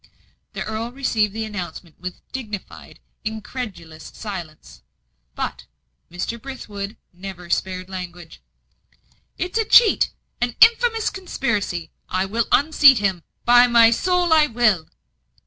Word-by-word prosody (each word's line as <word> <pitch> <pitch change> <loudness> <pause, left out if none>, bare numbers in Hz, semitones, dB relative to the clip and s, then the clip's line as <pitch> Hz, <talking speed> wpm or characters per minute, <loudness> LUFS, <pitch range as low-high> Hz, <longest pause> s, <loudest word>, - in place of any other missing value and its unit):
The - - -4
earl 220 +2 -4
received 235 -6 0
the 220 +2 -4
announcement 180 -5 -7
with 185 +1 -8
dignified, 215 -7 -8 0.2
incredulous 210 -7 -7
silence; 175 - -8 0.5
but - - -4 0.4
Mr. 185 +7 -4
Brithwood 210 -6 -7 0.2
never 180 -1 -9
spared 185 0 -1
language. 180 -3 -8 1.0
"It's 365 +5 -2
a - - +3
cheat 445 0 +5 0.3
an 245 -1 0
infamous 455 -1 +5
conspiracy! 210 - -3 0.2
I 185 +1 0
will 225 +4 -1
unseat 285 -2 +6
him 190 -4 0 0.2
by 245 +1 +7
my 235 -1 +6
soul 355 +6 +2
I 310 -1 +5
will!" 215 - +2
220 Hz, 115 wpm, -22 LUFS, 185-260 Hz, 1.0 s, by